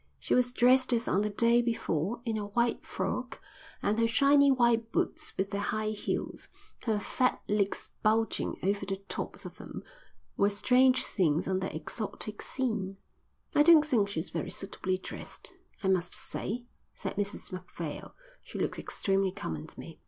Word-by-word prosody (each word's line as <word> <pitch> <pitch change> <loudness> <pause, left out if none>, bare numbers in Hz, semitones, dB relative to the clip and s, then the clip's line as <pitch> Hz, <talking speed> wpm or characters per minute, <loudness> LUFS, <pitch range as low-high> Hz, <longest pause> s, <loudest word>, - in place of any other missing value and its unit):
She - - -1
was 245 0 +3
dressed 255 +1 +4
as 235 0 +1
on 190 - +2
the 210 - 0
day 235 +3 +4
before, 230 -3 -1
in 225 -2 -1
a 210 -1 -3
white 235 +3 0
frock, 245 +7 -3 0.4
and 210 +2 +1
her 230 - +4
shiny 280 +4 +5
white 235 -3 +3
boots - - -1
with 190 +1 -1
their 200 - -1
high 215 +1 -1
heels, 210 - -3 0.4
her 220 -3 +1
fat 255 +4 +1
legs 200 -1 0
bulging 220 +1 +1
over 200 +2 +1
the 195 - -2
tops - - -5
of - - -9
them, - - -8 0.5
were 200 - +4
strange 255 +5 +4
things 165 -4 +1
on 190 0 +1
that 190 -5 -3
exotic 210 +6 -4
scene. 215 -7 -2 0.6
"I - - +5
don't 310 -1 +8
think 225 -9 +2
she's 160 -5 -3
very 165 -3 -3
suitably 190 -1 -1
dressed, 185 - -5 0.3
I - - +1
must 180 -2 +2
say," 240 +4 -3 0.3
said - - -4
Mrs 205 0 -3
Macphail. 175 -4 -6 0.3
"She - - -9
looks - - -1
extremely 195 -1 0
common 80 - -5
to - - -14
me." - - -9
210 Hz, 165 wpm, -30 LUFS, 190-240 Hz, 0.6 s, don't